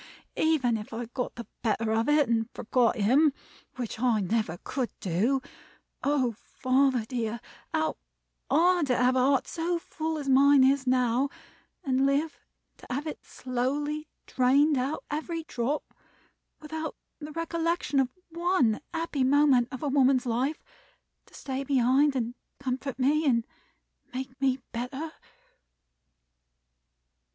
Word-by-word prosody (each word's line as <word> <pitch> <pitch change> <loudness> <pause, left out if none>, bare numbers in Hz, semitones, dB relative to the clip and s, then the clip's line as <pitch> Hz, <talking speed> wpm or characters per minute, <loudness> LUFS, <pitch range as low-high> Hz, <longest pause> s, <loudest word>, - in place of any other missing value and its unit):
Even 270 -8 +2
if 210 0 -8
I 235 +2 -3
got 245 +2 -4
the 235 - -7 0.2
better 225 -1 0
of 225 +4 +1
it, 295 -1 +4
and 225 0 0
forgot 240 +1 +2
him 265 +8 +4 0.4
(which 240 -3 -5
I 240 -3 +2
never 200 -3 -1
could), 255 -4 -2 1.1
oh, 270 -5 +1
father 255 +1 +1
dear, 235 -1 -3 0.3
how 315 0 0 0.5
hard 350 -2 +3
to 250 - +2
have 250 +1 +3
a - - +3
heart 270 +1 +3
so 340 +1 -1
full 320 -1 -4
as 290 -2 -5
mine 275 +1 +6
is 265 0 +3
now, 250 +1 +2 0.5
and 265 0 +2
live 290 +3 0 0.4
to - - -15
have 275 +4 -2
it 310 - -6
slowly 285 +5 -2 0.2
drained 280 +4 +3
out 265 +4 -2
every 325 +2 -3
drop, 275 0 -3 0.7
without 315 +1 -5 0.2
the 300 0 -7
recollection 330 -2 -1
of 260 -2 +2 0.2
one 335 - +2 0.2
happy 325 -5 -1
moment 270 -2 +4
of 260 - -6
a - - 0
woman's 265 -2 +3
life, 255 +6 -1 0.6
to - - -18
stay 270 0 -4
behind 270 +2 +3
and 240 -2 -1 0.2
comfort 265 0 -3
me, 290 +4 +2
and 235 -3 +2 0.7
make 260 +1 -6
me 265 -1 +2
better!" 265 +7 -4
265 Hz, 135 wpm, -28 LUFS, 245-295 Hz, 1.1 s, mine